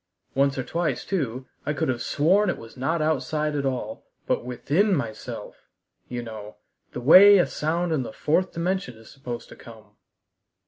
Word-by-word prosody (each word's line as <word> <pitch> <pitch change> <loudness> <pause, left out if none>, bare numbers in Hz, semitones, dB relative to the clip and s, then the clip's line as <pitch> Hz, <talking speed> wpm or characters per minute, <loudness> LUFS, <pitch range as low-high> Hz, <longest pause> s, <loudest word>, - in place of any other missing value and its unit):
Once 140 0 +2
or 130 - -1
twice, 160 -2 -2
too, 130 - -2 0.2
I 150 - -1
could 145 - -1
have 125 -2 -1
sworn 185 +7 +2
it - - -1
was 115 - -12
not 155 +5 -1
outside 150 0 -1
at 140 -1 0
all, 125 -5 -4 0.2
but - - 0
within 150 - +1
myself 110 -7 -6 0.4
you 120 -1 -5
know 110 -2 -9 0.4
the - - -5
way 195 +10 +9
a 180 - +4
sound 165 +3 -2
in 150 - +1
the 120 - -6
fourth 175 +10 0
dimension 170 - -2
is 110 0 -15
supposed 125 -3 -7
to - - -12
come." 110 -3 -15
140 Hz, 175 wpm, -25 LUFS, 120-170 Hz, 0.4 s, way